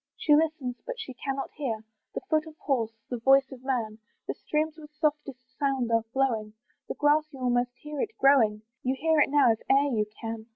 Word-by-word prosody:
She 300 - +3
listens, 300 -6 0
but - - -6
she 275 -12 -6
cannot 270 +2 -4
hear 230 -7 -3 0.3
The - - -2
foot 310 -2 +1
of 315 -1 -12
horse, 230 -5 -1
the 245 - -2
voice 270 +3 +4
of 260 -1 -11
man; 230 -5 -2 0.3
The - - -1
streams 310 +1 -2
with 300 -1 -11
softest 285 -4 -2
sound 270 -4 0
are 230 0 +4
flowing, 225 -6 0 0.3
The - - -4
grass 300 +1 +2
you 270 - -11
almost 245 -1 0
hear 300 -1 -5
it 445 - -4
growing, 225 -6 +4 0.2
You 260 +1 0
hear 320 +1 +2
it 295 - +4
now 285 -4 +5
if 225 - -1
e'er 275 -1 +4
you 210 -1 +1
can. 225 -1 -5
270 Hz, 205 wpm, -28 LUFS, 240-300 Hz, 0.3 s, now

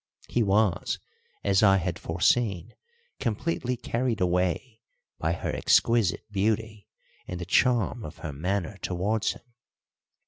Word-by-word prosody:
He 120 - 0
was, 100 -3 +2 0.5
as 100 -1 +3
I 95 -2 +6
had 90 -1 -2
foreseen, 95 +2 +1 0.5
completely 125 +1 -1
carried 120 -1 -1
away 90 +6 0 0.4
by 80 +1 0
her - - -3
exquisite 110 -6 +3
beauty 105 +1 -1 0.4
and 90 - -5
the 90 - -4
charm 120 +3 +2
of 75 - -8
her 75 - -4
manner 90 +5 -2
towards 100 +5 0
him. - - -16
100 Hz, 125 wpm, -27 LUFS, 90-115 Hz, 0.5 s, I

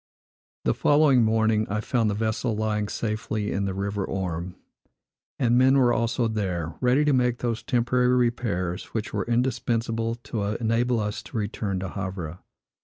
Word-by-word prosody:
The - - +3
following 145 -4 +4
morning, 110 -1 +2
I 105 +1 -1
found 115 0 +1
the 100 - -1
vessel 110 +2 -1
lying 105 -1 -1
safely 110 -1 -2
in 100 0 -1
the 95 - -2
river 100 +1 -2
Orme; 90 -2 -3 0.8
and 120 -2 +3
men 130 +2 +5
were 125 -3 +4
also 115 +1 +1
there, 90 -7 -2
ready 130 +4 +3
to 145 - +3
make 125 -2 +2
those 115 -2 -2
temporary 125 0 +1
repairs 115 -8 0
which 110 -1 -3
were - - -1
indispensable 115 -2 0
to 110 - -3 0.2
enable 120 +1 +1
us 105 -1 -3
to 120 - -7
return 100 -2 -2
to 95 - -4
Havre. 95 -3 -5
110 Hz, 160 wpm, -25 LUFS, 100-120 Hz, 0.8 s, men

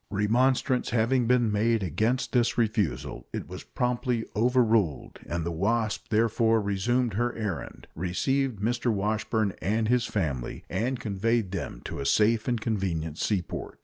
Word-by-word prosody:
Remonstrance 125 +5 +2
having 120 +1 +2
been 120 -3 +3
made 110 +1 +2
against 110 - 0
this 120 -2 +2
refusal, 110 -7 -1
it - - -5
was - - -8
promptly 125 -1 -1
overruled, 115 - +2
and 85 -1 -2
the 85 - -1
Wasp 105 +5 0
therefore 115 0 +3
resumed 110 +4 0
her 120 +4 0
errand, 105 -6 -5
received 125 - 0
Mr. 120 +3 0
Washburn 110 0 0
and 110 +5 0
his 125 -1 +2
family, 70 - -3
and 120 +7 -1
conveyed 110 -1 0
them 85 -10 -5
to - - -5
a 70 - -3
safe 110 +6 +3
and 120 -2 +1
convenient 90 -8 -2
seaport. 95 -5 -2
110 Hz, 145 wpm, -27 LUFS, 100-120 Hz, -, been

